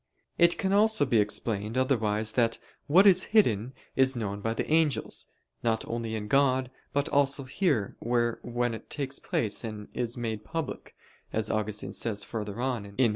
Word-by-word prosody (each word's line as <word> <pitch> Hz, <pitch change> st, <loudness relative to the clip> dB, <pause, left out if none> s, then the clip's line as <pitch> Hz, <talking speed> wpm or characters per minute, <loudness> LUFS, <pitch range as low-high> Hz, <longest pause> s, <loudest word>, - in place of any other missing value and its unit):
It 170 Hz, 0 st, +5 dB
can 190 Hz, 0 st, 0 dB
also 215 Hz, -6 st, +4 dB
be 120 Hz, -4 st, +3 dB
explained 105 Hz, +2 st, 0 dB
otherwise 110 Hz, -5 st, +1 dB
that 115 Hz, -1 st, +1 dB, 0.3 s
"what 180 Hz, +7 st, +6 dB
is 185 Hz, -2 st, +6 dB
hidden, 120 Hz, -, +3 dB, 0.2 s
is 130 Hz, 0 st, +4 dB
known 100 Hz, -3 st, -3 dB
by 115 Hz, +2 st, -1 dB
the -, -, -2 dB
angels, 155 Hz, -2 st, +1 dB, 0.3 s
not 115 Hz, -1 st, 0 dB
only 115 Hz, -1 st, -3 dB
in 105 Hz, -1 st, -4 dB
God, 130 Hz, 0 st, +2 dB, 0.2 s
but 145 Hz, 0 st, 0 dB
also 140 Hz, 0 st, +2 dB
here 130 Hz, -, 0 dB
where 120 Hz, 0 st, 0 dB
when 120 Hz, 0 st, -1 dB
it 110 Hz, -, -9 dB
takes 140 Hz, -2 st, -3 dB
place 105 Hz, 0 st, -1 dB
and 110 Hz, -2 st, -6 dB
is 120 Hz, -1 st, -2 dB
made 110 Hz, -3 st, -3 dB
public," 165 Hz, +5 st, -5 dB, 0.4 s
as 110 Hz, -1 st, -1 dB
Augustine 110 Hz, 0 st, -2 dB
says 105 Hz, -3 st, -2 dB
further 105 Hz, -1 st, -5 dB
on 125 Hz, -4 st, -1 dB
(Gen. 100 Hz, -, -11 dB
ad -, -, -15 dB
lit. 125 Hz, -3 st, +5 dB
120 Hz, 180 wpm, -28 LUFS, 110-140 Hz, 0.4 s, what